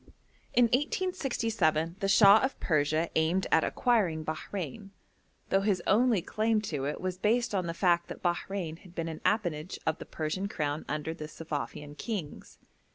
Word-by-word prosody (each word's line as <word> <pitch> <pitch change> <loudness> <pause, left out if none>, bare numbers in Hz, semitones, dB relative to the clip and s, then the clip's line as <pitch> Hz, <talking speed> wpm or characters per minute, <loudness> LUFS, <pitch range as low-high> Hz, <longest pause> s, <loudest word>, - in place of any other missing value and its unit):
In 245 - +6
1867 230 - 0
the 195 - 0
Shah 200 +1 +8
of 265 0 -1
Persia 155 +1 +1
aimed 170 +4 +2
at 160 - +5
acquiring 185 -11 +1
Bahrein, 165 +3 -5 0.6
though 195 - +3
his 195 -2 +1
only 220 -3 +3
claim 220 +2 +1
to 135 -2 -1
it 145 - -3
was 185 -1 -3
based 230 +3 +1
on 185 -3 0
the 165 - -3
fact 175 -1 +2
that - - -9
Bahrein 175 -1 -2
had 180 -1 -17
been 165 0 -2
an 160 -1 -6
appanage 175 -6 0
of 160 - 0
the - - -7
Persian 160 +5 -3
crown 150 -5 -3
under 150 +2 -2
the 155 -2 -7
Suffavian 150 -2 -5
kings. 185 -7 -6
180 Hz, 160 wpm, -30 LUFS, 155-210 Hz, 0.6 s, Shah